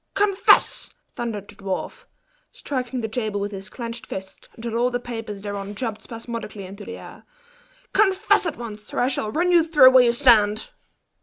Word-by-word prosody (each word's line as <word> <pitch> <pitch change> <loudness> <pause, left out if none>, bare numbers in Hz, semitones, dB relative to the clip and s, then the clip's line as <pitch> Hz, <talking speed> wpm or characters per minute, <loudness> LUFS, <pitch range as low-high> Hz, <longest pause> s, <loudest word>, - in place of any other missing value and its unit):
"Confess!" 400 -1 +3 0.2
thundered 215 -4 -5
the - - -12
dwarf, 195 -1 -5 0.5
striking 255 -2 -4
the 220 - -2
table 220 -2 -2
with 205 +1 -3
his 195 0 -8
clinched 235 0 -7
fist, 190 0 -8
until 230 0 -5
all 240 +2 +2
the 245 0 -2
papers 225 -4 -7
thereon 205 0 -5
jumped 225 -1 -4
spasmodically 230 -4 -7
into 200 +3 -10
the - - -7
air - - -12 0.7
"confess 405 -1 +3
at 325 - -4
once, 215 -3 -8
or - - 0
I 250 - +2
shall 215 -5 -2
run 350 +7 +1
you 345 -2 +6
through 295 -6 +7
where 255 -1 +7
you 235 -1 +3
stand!" 220 -5 +4
230 Hz, 175 wpm, -23 LUFS, 210-255 Hz, 0.7 s, through